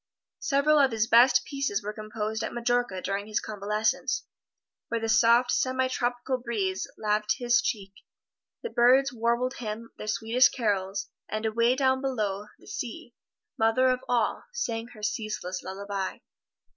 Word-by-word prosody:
Several 295 +1 +3
of 275 -2 +5
his 220 -2 0
best 245 +3 +5
pieces 275 -8 -2
were 210 +1 -4
composed 215 0 -4
at - - -4
Majorca 240 -5 0
during 200 +1 -2
his 215 - 0
convalescence, 210 +1 -1 0.6
where 230 - -1
the 225 - -2
soft 235 +2 +4
semi 260 0 +1
tropical 250 0 -1
breeze 205 -6 -2
laved 210 0 +1
his 240 -2 +3
cheek, 195 -3 -3 0.7
the 470 - -4
birds 255 +3 +4
warbled 235 +2 0
him 230 0 -6
their 215 - -6
sweetest 225 +4 +3
carols, 200 -4 -1 0.2
and 215 +1 -3
away 230 +3 +2
down 260 -1 +2
below, 210 -7 -2
the - - -20
sea, 245 - -6 0.5
mother 225 +4 +4
of 255 0 +1
all, 240 -3 +1
sang 230 - -3
her 215 -3 -14
ceaseless 210 -4 -3
lullaby. 195 0 -4
230 Hz, 145 wpm, -27 LUFS, 210-250 Hz, 0.7 s, of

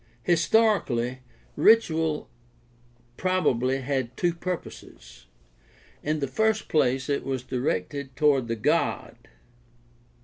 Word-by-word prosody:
— 120 - -35
Historically, 165 - +2 0.4
ritual 160 -5 +3 0.9
probably 135 -8 +1
had 130 -2 -3
two 175 -1 +1
purposes. 180 +1 -8 0.7
In 155 0 -2
the 140 - 0
first 220 - 0
place 130 -3 +1
it 140 -1 -1
was 130 -2 -3
directed 130 +1 -3
toward 140 -4 +2
the 115 - -2
god. 110 - 0
140 Hz, 100 wpm, -26 LUFS, 130-170 Hz, 0.9 s, ritual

